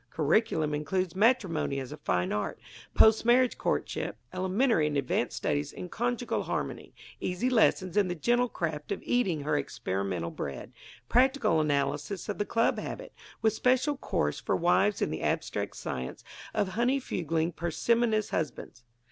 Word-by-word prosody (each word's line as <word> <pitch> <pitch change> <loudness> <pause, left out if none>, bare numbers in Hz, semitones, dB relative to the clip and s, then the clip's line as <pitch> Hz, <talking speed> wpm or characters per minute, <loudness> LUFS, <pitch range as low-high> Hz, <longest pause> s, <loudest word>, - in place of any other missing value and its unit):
Curriculum 160 - +1
includes 175 +5 -1
Matrimony 190 - +2
as 130 0 -6
a 150 - -7
Fine 90 -6 0
Art, 105 -2 -2 0.4
Post 220 0 +6
Marriage 245 +1 +4
Courtship, - - -2 0.2
Elementary 190 - +2
and 150 -1 -1
Advanced 130 -3 -1
Studies 145 0 -1
in 180 - -8
Conjugal 245 +3 -1
Harmony, - - -4 0.2
Easy 190 +8 -1
Lessons 190 -6 +3
in 205 -2 +4
the 175 - -2
Gentle 240 +8 +2
Craft 155 -5 -4
of 200 - -3
Eating 190 -11 +1
Her 145 +1 0
Experimental 95 -3 -3
Bread, 70 -2 -6 0.3
Practical 255 - +3
Analysis 145 +5 -1
of 205 - -3
the 205 - +1
Club 230 +2 +1
Habit, - - -6 0.3
with 220 -1 +4
special 255 +5 +2
course 75 - -1
for - - 0
wives 195 +4 +2
in - - -1
the 80 - -4
Abstract - - -2
Science 65 0 -5 0.3
of 205 -3 0
Honeyfugling 180 - 0
Parsimonious 215 +6 +1
Husbands. 145 -6 -4
180 Hz, 150 wpm, -29 LUFS, 150-230 Hz, 0.4 s, Post